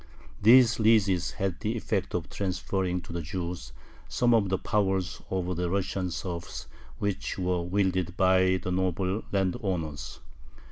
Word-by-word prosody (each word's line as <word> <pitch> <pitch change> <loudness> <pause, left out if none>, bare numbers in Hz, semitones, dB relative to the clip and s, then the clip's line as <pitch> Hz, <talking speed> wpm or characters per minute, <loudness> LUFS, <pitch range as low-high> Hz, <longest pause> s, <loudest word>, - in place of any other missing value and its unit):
These 120 +2 +6
leases 100 -6 +3
had 95 -2 -2
the 115 +1 -2
effect 100 -5 -2
of 85 -2 -2
transferring 95 -1 -2
to 85 - -10
the 85 - -2
Jews 85 -5 -5 0.4
some 120 -1 +2
of 105 -4 +3
the 95 - +1
powers 95 -3 0
over 90 -1 -1
the 90 0 -1
Russian 95 0 -1
serfs 85 0 -5 0.3
which 100 +5 -2
were 90 -1 0
wielded 95 0 0
by 95 0 +4
the 90 - -4
noble 95 +2 0
landowners. 90 -6 -2
95 Hz, 140 wpm, -28 LUFS, 90-100 Hz, 0.4 s, These